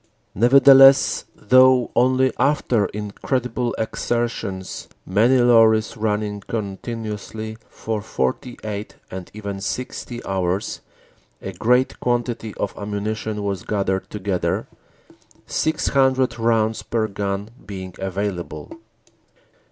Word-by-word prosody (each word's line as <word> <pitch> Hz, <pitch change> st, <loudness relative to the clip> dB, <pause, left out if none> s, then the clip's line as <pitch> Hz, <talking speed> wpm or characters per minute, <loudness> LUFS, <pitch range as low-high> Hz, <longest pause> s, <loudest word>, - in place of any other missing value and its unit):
Nevertheless, 135 Hz, +4 st, +6 dB
though 130 Hz, +2 st, +4 dB
only 130 Hz, +1 st, +3 dB
after 125 Hz, -7 st, +2 dB
incredible 120 Hz, +4 st, -3 dB
exertions, 110 Hz, -4 st, -3 dB, 0.2 s
many 115 Hz, +8 st, +3 dB
lorries 115 Hz, -3 st, +4 dB
running 105 Hz, -2 st, -1 dB
continuously 110 Hz, +1 st, -5 dB
for 110 Hz, -2 st, -4 dB
forty 110 Hz, -, -3 dB
eight 105 Hz, -1 st, -5 dB, 0.2 s
and 95 Hz, -1 st, -7 dB
even 100 Hz, -2 st, -5 dB
sixty 120 Hz, +2 st, -4 dB
hours, 95 Hz, 0 st, -2 dB, 0.6 s
a -, -, -6 dB
great 125 Hz, +3 st, +1 dB
quantity 120 Hz, -3 st, -2 dB
of 100 Hz, -, -3 dB
ammunition 105 Hz, +1 st, -3 dB
was 100 Hz, -3 st, -2 dB
gathered 95 Hz, -2 st, -2 dB
together, 100 Hz, -3 st, -2 dB, 0.8 s
six 155 Hz, 0 st, 0 dB
hundred 130 Hz, -2 st, +2 dB
rounds 115 Hz, -1 st, +1 dB
per 110 Hz, -2 st, -1 dB
gun 100 Hz, +1 st, -3 dB
being 95 Hz, -2 st, -7 dB
available. 95 Hz, -, -4 dB
110 Hz, 95 wpm, -22 LUFS, 100-120 Hz, 0.8 s, Nevertheless